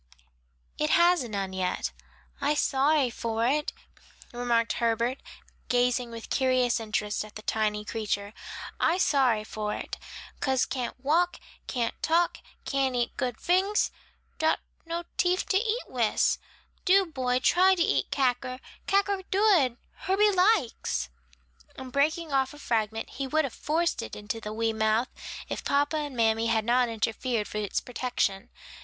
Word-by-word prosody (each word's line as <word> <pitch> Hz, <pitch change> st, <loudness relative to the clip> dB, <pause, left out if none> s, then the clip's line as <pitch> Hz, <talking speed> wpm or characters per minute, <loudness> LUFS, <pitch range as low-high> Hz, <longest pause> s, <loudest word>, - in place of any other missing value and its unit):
"It 300 Hz, -, +1 dB
has 345 Hz, -2 st, +5 dB
none 200 Hz, -4 st, -3 dB
yet." 185 Hz, -1 st, -1 dB, 0.5 s
"I 295 Hz, +1 st, +2 dB
sorry 280 Hz, -2 st, +2 dB
for 230 Hz, 0 st, -1 dB
it," 295 Hz, +4 st, +1 dB, 0.6 s
remarked 235 Hz, -1 st, +1 dB
Herbert, 235 Hz, +3 st, +1 dB, 0.5 s
gazing 245 Hz, 0 st, +2 dB
with 230 Hz, -1 st, -9 dB
curious 255 Hz, -3 st, +2 dB
interest 210 Hz, -2 st, -2 dB
at 215 Hz, 0 st, -13 dB
the 215 Hz, -, -8 dB
tiny 210 Hz, -1 st, 0 dB
creature, 205 Hz, -2 st, -3 dB, 0.5 s
"I 335 Hz, -, +3 dB
sorry 260 Hz, -, +3 dB
for 215 Hz, -1 st, -3 dB
it; -, -, -6 dB, 0.4 s
cause 265 Hz, -1 st, +2 dB
can't 255 Hz, -1 st, -4 dB
walk, 345 Hz, +5 st, +2 dB, 0.3 s
can't 240 Hz, -3 st, -2 dB
talk, 340 Hz, +2 st, +2 dB, 0.3 s
can't 270 Hz, -2 st, 0 dB
eat 240 Hz, -1 st, -1 dB
good 245 Hz, -3 st, -2 dB
fings; 380 Hz, +4 st, +2 dB, 0.5 s
dot 315 Hz, 0 st, +2 dB, 0.3 s
no 335 Hz, +1 st, -3 dB
teef 360 Hz, +1 st, +2 dB
to 380 Hz, -, +4 dB
eat 455 Hz, +3 st, 0 dB
wis. 235 Hz, -4 st, +1 dB, 0.4 s
Do, 390 Hz, +1 st, +5 dB
boy, 255 Hz, -6 st, 0 dB
try 370 Hz, +8 st, +4 dB
to 345 Hz, -, +2 dB
eat -, -, +1 dB
cacker, 255 Hz, -1 st, 0 dB, 0.3 s
cacker 395 Hz, 0 st, +2 dB
dood, 375 Hz, -, +3 dB, 0.3 s
Herbie 410 Hz, +2 st, +4 dB
likes," 365 Hz, -, +1 dB, 0.7 s
and 260 Hz, -1 st, -8 dB
breaking 305 Hz, +3 st, +1 dB
off 270 Hz, +1 st, +1 dB
a -, -, -12 dB
fragment 225 Hz, -4 st, -1 dB
he 275 Hz, +1 st, -4 dB
would 310 Hz, +3 st, +2 dB
have 265 Hz, -, -5 dB
forced 330 Hz, +3 st, 0 dB
it -, -, -7 dB
into 210 Hz, +2 st, -5 dB
the 210 Hz, -, -5 dB
wee 225 Hz, +1 st, 0 dB
mouth, 220 Hz, +3 st, +1 dB, 0.4 s
if -, -, -4 dB
papa 290 Hz, +2 st, +1 dB
and 290 Hz, -4 st, -4 dB
mammy 225 Hz, 0 st, +2 dB
had 220 Hz, -1 st, +1 dB
not 245 Hz, +1 st, +3 dB
interfered 225 Hz, 0 st, -1 dB
for 210 Hz, -, -4 dB
its 205 Hz, -2 st, -1 dB
protection. 245 Hz, -6 st, -2 dB
255 Hz, 150 wpm, -28 LUFS, 225-315 Hz, 0.7 s, has